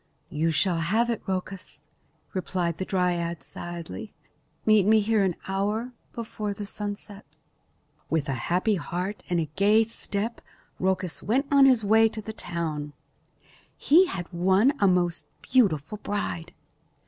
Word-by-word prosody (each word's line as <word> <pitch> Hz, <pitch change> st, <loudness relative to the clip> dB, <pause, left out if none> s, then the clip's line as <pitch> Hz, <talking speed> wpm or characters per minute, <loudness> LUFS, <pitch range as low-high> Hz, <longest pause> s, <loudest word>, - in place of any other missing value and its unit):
"You 160 Hz, +2 st, +1 dB
shall 165 Hz, +3 st, +2 dB
have 220 Hz, +8 st, +1 dB
it, 230 Hz, -, -3 dB
Rhoecus," 190 Hz, 0 st, -5 dB, 0.5 s
replied 175 Hz, -2 st, -2 dB
the 190 Hz, -, -2 dB
dryad 175 Hz, -3 st, -1 dB
sadly. 170 Hz, -, -7 dB, 0.5 s
"Meet 215 Hz, -3 st, +5 dB
me 220 Hz, 0 st, +6 dB
here 215 Hz, 0 st, +2 dB
an 185 Hz, -3 st, +1 dB
hour 210 Hz, +6 st, -1 dB, 0.2 s
before 215 Hz, -3 st, -4 dB
the 205 Hz, -, -5 dB
sunset." 205 Hz, 0 st, -6 dB, 0.9 s
With 160 Hz, -3 st, 0 dB
a 135 Hz, -, -1 dB, 0.2 s
happy 185 Hz, +4 st, +2 dB
heart 180 Hz, +4 st, -4 dB
and 175 Hz, -1 st, +1 dB
a 155 Hz, -3 st, -3 dB
gay 210 Hz, +3 st, +5 dB
step 225 Hz, 0 st, -4 dB, 0.4 s
Rhoecus 185 Hz, -2 st, -1 dB
went 260 Hz, +7 st, +1 dB
on 275 Hz, -1 st, +7 dB
his 250 Hz, -4 st, +4 dB
way 220 Hz, +2 st, +5 dB
to 220 Hz, -, -4 dB
the 220 Hz, +1 st, -6 dB
town. 155 Hz, -7 st, -4 dB, 0.8 s
He 350 Hz, +6 st, +5 dB
had 175 Hz, -, -4 dB
won 190 Hz, +9 st, +4 dB
a 200 Hz, -, +4 dB
most 180 Hz, -2 st, +1 dB, 0.2 s
beautiful 205 Hz, -, +2 dB
bride. 175 Hz, -5 st, -3 dB
195 Hz, 140 wpm, -26 LUFS, 175-215 Hz, 0.9 s, on